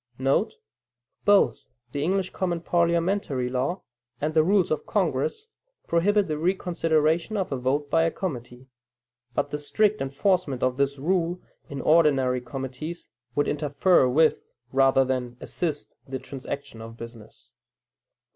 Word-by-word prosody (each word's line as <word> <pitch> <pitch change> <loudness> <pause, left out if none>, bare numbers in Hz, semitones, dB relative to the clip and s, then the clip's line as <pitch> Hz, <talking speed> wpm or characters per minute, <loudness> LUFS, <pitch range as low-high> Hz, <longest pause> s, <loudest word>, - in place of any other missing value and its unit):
* 120 - -40 1.1
[Both 205 -1 +4 0.3
the 140 - -3
English 185 +4 0
common 175 -3 -2
parliamentary 170 -6 +1
law 130 +9 -2 0.4
and 155 +2 -1
the 160 - +5
rules 190 0 +2
of 155 -1 -2
Congress 445 -2 0 0.4
prohibit 200 +4 +2
the 155 -1 -2
reconsideration 165 +1 +1
of 190 -5 -2
a - - 0
vote 135 +3 -1
by 165 - +4
a - - +3
committee; 125 -8 -6 0.7
but 145 0 0
the 150 - -2
strict 210 +8 +1
enforcement 140 0 0
of 130 0 +1
this 140 0 +1
rule 175 +4 0 0.3
in 140 -1 -5
ordinary 135 -6 +3
committees, 135 +6 -6 0.3
would 145 - +2
interfere 150 0 +3
with 155 +5 +3 0.3
rather 135 0 +4
than 125 -2 -3
assist 155 -4 -3
the 135 0 -3
transaction 140 -2 -7
of 115 +1 -10
business. 115 - -12
150 Hz, 135 wpm, -26 LUFS, 130-175 Hz, 1.1 s, the